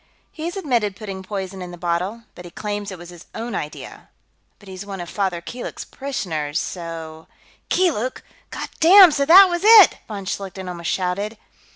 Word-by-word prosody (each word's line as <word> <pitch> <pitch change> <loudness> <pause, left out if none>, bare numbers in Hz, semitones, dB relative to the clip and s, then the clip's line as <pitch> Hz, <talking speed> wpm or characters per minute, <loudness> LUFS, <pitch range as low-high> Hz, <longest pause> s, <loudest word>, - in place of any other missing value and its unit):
"He's 340 +4 -6
admitted 235 - -1
putting 195 -3 -7
poison 190 -1 -6
in 180 - -7
the 175 - -10
bottle, 180 +6 -2
but 175 - -12
he 175 - -10
claims 205 +2 -5
it 190 - -8
was 175 0 -11
his 175 -2 -14
own 230 +1 -5
idea. 150 -5 -7 0.5
But 205 - -19
he's 190 0 -8
one 200 -1 -7
of 175 -1 -7
Father 190 -4 -2
Keeluk's 240 +8 -7
parishioners, 160 - -4
so...." 165 -3 -6 0.4
"Keeluk! 270 - 0 0.3
God - - -6
damn, 365 +1 +8
so 280 -1 0
that 380 +4 +9
was 345 -1 -2
it!" 435 -3 +8
von 200 -3 -7
Schlichten 190 -1 -5
almost 170 -2 -5
shouted. 195 +4 -2
195 Hz, 175 wpm, -21 LUFS, 175-245 Hz, 0.5 s, that